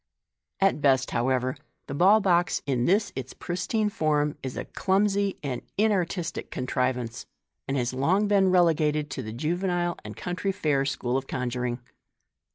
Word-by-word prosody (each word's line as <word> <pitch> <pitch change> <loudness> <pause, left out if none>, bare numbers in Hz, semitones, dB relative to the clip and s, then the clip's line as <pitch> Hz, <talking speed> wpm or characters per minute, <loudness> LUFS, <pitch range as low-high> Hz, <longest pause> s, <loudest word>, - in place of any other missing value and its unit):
At 195 -6 +2
best, 130 -2 +3
how 120 +2 +1
ever, 130 0 0 0.3
the - - -6
ball 195 +8 +5
box, 175 -2 +2
in 125 -3 0
this 200 +3 +2
its 130 -1 -6
pristine 210 +5 -1
form, 150 -5 +1
is 130 -1 -5
a - - -3
clumsy 200 0 +1
and 130 -4 -3 0.2
inartistic 190 -5 0
contrivance, 125 -2 -2 0.4
and 135 - -1
has 120 -1 -1
long 180 +11 +2
been 195 -2 +4
relegated 155 -5 +2
to 135 - -3
the 110 -3 -6
juvenile 175 - -1
and - - -9
country 180 +2 -2
fair 150 -8 0
school 130 -2 -1
of 135 0 -4
conjuring. 125 -1 -2
150 Hz, 155 wpm, -26 LUFS, 130-190 Hz, 0.4 s, ball